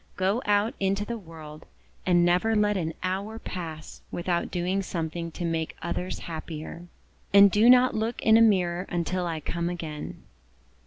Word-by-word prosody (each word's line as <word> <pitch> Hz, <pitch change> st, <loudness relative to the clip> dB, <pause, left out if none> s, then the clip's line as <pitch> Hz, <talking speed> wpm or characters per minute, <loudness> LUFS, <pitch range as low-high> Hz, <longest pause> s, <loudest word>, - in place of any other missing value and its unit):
Go 195 Hz, +5 st, +1 dB
out 205 Hz, +2 st, +2 dB
into 195 Hz, +1 st, 0 dB
the 235 Hz, +1 st, -4 dB
world, 160 Hz, -4 st, -12 dB, 0.4 s
and 175 Hz, -1 st, +4 dB
never 180 Hz, +6 st, +2 dB
let 210 Hz, 0 st, +2 dB
an 160 Hz, -4 st, -2 dB
hour 195 Hz, +4 st, -2 dB
pass 165 Hz, -7 st, -7 dB
without 175 Hz, 0 st, -2 dB
doing 180 Hz, +2 st, -1 dB
something 170 Hz, -2 st, -4 dB
to 175 Hz, -, -4 dB
make 165 Hz, -1 st, -2 dB
others 180 Hz, +2 st, -3 dB
happier. 165 Hz, +1 st, -7 dB, 0.5 s
And 200 Hz, 0 st, +8 dB
do 215 Hz, +5 st, +5 dB
not 255 Hz, 0 st, +6 dB
look 220 Hz, +2 st, -2 dB
in 220 Hz, -, +6 dB
a 225 Hz, -, +7 dB
mirror 185 Hz, -4 st, +2 dB
until 175 Hz, +1 st, -1 dB
I 165 Hz, -2 st, -3 dB
come 170 Hz, +3 st, -2 dB
again." 160 Hz, -4 st, -6 dB
180 Hz, 160 wpm, -27 LUFS, 170-205 Hz, 0.5 s, And